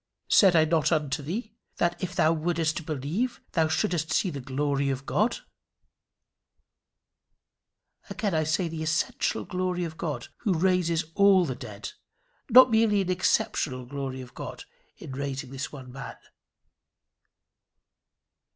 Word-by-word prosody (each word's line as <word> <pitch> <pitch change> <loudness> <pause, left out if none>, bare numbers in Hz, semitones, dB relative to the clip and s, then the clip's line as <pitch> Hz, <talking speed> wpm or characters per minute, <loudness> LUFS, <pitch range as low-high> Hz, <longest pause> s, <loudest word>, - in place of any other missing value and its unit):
"Said 190 -4 +6
I 160 -1 +6
not 160 0 +2
unto 150 -2 0
thee, 210 - -5 0.2
that 175 0 0
if 185 0 -3
thou 160 -2 +4
wouldest 165 0 -1
believe, 160 - -2
thou 160 -2 +2
shouldest 160 0 0
see 185 - +1
the 140 - -5
glory 140 +1 -1
of 135 0 -3
God?" 225 - +1 2.7
Again 205 -6 -2
I 155 -1 +2
say 160 +3 0
the 160 -1 -5
essential 160 +1 -1
glory 180 -1 -2
of 160 -2 -6
God 155 -4 -4
who 195 -7 0
raises 175 -2 +2
all 200 -2 +5
the 135 - -2
dead, 105 -6 -8 0.6
not 255 +1 +8
merely 220 -2 +3
an 185 -1 -1
exceptional 140 -7 0
glory 135 0 -5
of 125 -1 -12
God - - -7 0.3
in - - -9
raising 135 -1 -4
this 135 +2 -5
one 135 -3 -9
dead - - -15
man. 135 - -8
160 Hz, 140 wpm, -27 LUFS, 140-185 Hz, 2.7 s, not